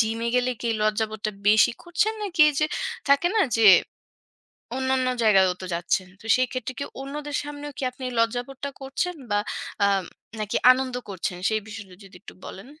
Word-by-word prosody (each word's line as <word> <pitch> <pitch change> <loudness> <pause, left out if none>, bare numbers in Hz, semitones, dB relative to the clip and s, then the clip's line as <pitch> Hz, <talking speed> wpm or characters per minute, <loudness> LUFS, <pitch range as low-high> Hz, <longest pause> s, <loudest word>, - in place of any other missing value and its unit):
Gym 225 0 0
এ - - 0
গেলে 250 0 +2
কি 235 - -2
লজ্জাবোধটা 215 0 -1 0.2
বেশি 215 +1 +6
করছেন? 355 +6 0
নাকি 370 -5 -2
এই - - -9
যে 305 - +3 0.4
থাকে 280 +5 +4
না 410 - +5 0.2
যে 225 - +5 1.1
অন্যান্য 260 -1 +1 0.2
জায়গাতেও 190 -4 +4
তো - - -5
যাচ্ছেন। 175 +2 -1
তো - - -12
সেই 255 - +2
ক্ষেত্রে 255 -1 -4
কি 280 - -2 0.2
অন্যদের 290 +1 -5
সামনেও 290 0 -7
কি - - -5
আপনি 255 +1 -10
লজ্জাবোধটা 245 +4 -1
করছেন 275 +7 -3 0.2
বা 205 - +2 0.5
আম 195 -2 +1 0.4
নাকি 210 -1 -2 0.2
আনন্দ 255 0 -3
করছেন 185 -2 -4
সেই 220 -1 0
বিষয়টা 205 -4 -9
যদি 195 -1 -14
একটু - - -13
বলেন? 195 +4 -9
245 Hz, 175 wpm, -24 LUFS, 215-280 Hz, 1.1 s, বেশি